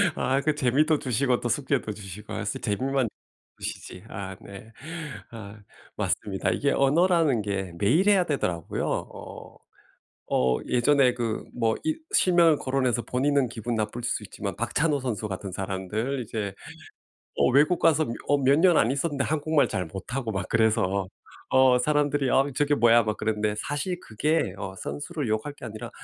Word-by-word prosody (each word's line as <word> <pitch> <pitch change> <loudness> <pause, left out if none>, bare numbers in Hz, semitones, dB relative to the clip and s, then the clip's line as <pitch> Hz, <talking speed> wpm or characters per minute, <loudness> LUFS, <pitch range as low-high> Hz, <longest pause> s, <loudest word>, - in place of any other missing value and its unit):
아 135 +1 +1
그 155 0 +1
재미도 150 +3 +2
주시고 125 0 +1
또 120 - -3
숙제도 130 -3 0
주시고 100 0 -9
아 - - -3
쓰 130 +6 -3
재미만 130 +4 0 0.5
주시지. 90 - -7
아 95 -1 -6
네. 100 +3 -11 0.6
아 110 -2 -9 0.4
맞습니다. 95 -3 -1
이게 105 +10 +1
언어라는 155 - +3
게 95 -3 -3
매일 155 - +3
해야 195 -3 +4
되더라고요. 90 - -2
어 - - -6 0.7
어 65 0 +2
예전에 125 0 +3
그 115 -3 -2
뭐 115 -2 +1
이 315 0 0 0.2
실명을 170 -4 +4
거론해서 130 -3 0
본인은 135 +1 +1
기분 115 +1 -4
나쁠 110 +2 -3
수 120 -2 -1
있지만 100 0 -6
박찬호 145 +6 0
선수 115 -4 -3
같은 95 0 -5
사람들 100 +8 -3
이제 105 -2 -4 0.8
어 - - +3
외국 150 +6 +4
가서 160 -2 +3
며 115 - -3 0.2
어 145 - +4
몇 140 +1 +4
년 175 0 +5
안 115 - +3
있었는데 140 0 -1
한국말 155 -1 +1
잘 90 - -2
못하고 110 +7 -5
막 95 -2 -3
그래서 100 -4 +2 0.4
어 130 -1 +5
사람들이 145 0 +1
아 135 - +5
저게 145 +1 +2
뭐야 120 -2 +5
막 105 0 -1
그러는데 105 -1 -1
사실 145 - -3
그게 130 - -1
어 95 -1 -5
선수를 145 - -4
욕할 110 +7 -1
게 145 - -12
아니라 110 -1 -7
125 Hz, 320 characters per minute, -26 LUFS, 105-145 Hz, 0.8 s, 년